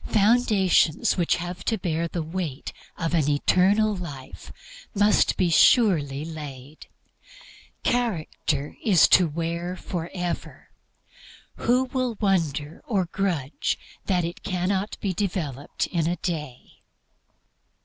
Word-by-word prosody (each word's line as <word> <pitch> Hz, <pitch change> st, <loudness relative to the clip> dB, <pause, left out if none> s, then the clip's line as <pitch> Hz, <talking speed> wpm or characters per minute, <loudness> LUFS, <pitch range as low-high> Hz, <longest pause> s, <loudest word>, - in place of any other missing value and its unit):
Foundations 205 Hz, -7 st, +3 dB
which 175 Hz, -3 st, +2 dB
have 175 Hz, +1 st, -6 dB
to 225 Hz, -, +1 dB
bear 170 Hz, -3 st, -1 dB
the 170 Hz, 0 st, -4 dB
weight 160 Hz, -4 st, -5 dB, 0.2 s
of 165 Hz, -1 st, -2 dB
an 155 Hz, -4 st, +2 dB
eternal 195 Hz, +8 st, +3 dB
life 145 Hz, -8 st, -9 dB, 0.4 s
must 205 Hz, +1 st, +3 dB
be 175 Hz, -2 st, +2 dB
surely 155 Hz, -, +4 dB
laid. 150 Hz, -3 st, -9 dB, 1.0 s
Character 160 Hz, -, -1 dB
is 195 Hz, -7 st, +6 dB
to 180 Hz, -, +6 dB
wear 170 Hz, +3 st, -3 dB
forever; 175 Hz, -1 st, -5 dB, 0.9 s
who 250 Hz, +2 st, +2 dB
will 255 Hz, -3 st, -2 dB
wonder 160 Hz, -7 st, 0 dB
or 195 Hz, -5 st, +1 dB
grudge 170 Hz, -6 st, -2 dB, 0.3 s
that 180 Hz, -3 st, +1 dB
it 170 Hz, -, -6 dB
cannot 190 Hz, +1 st, -2 dB
be 195 Hz, -2 st, -1 dB
developed 165 Hz, -8 st, -3 dB
in 165 Hz, -3 st, -1 dB
a 175 Hz, -, 0 dB
day? 150 Hz, -7 st, -6 dB
175 Hz, 110 wpm, -25 LUFS, 155-195 Hz, 1.0 s, is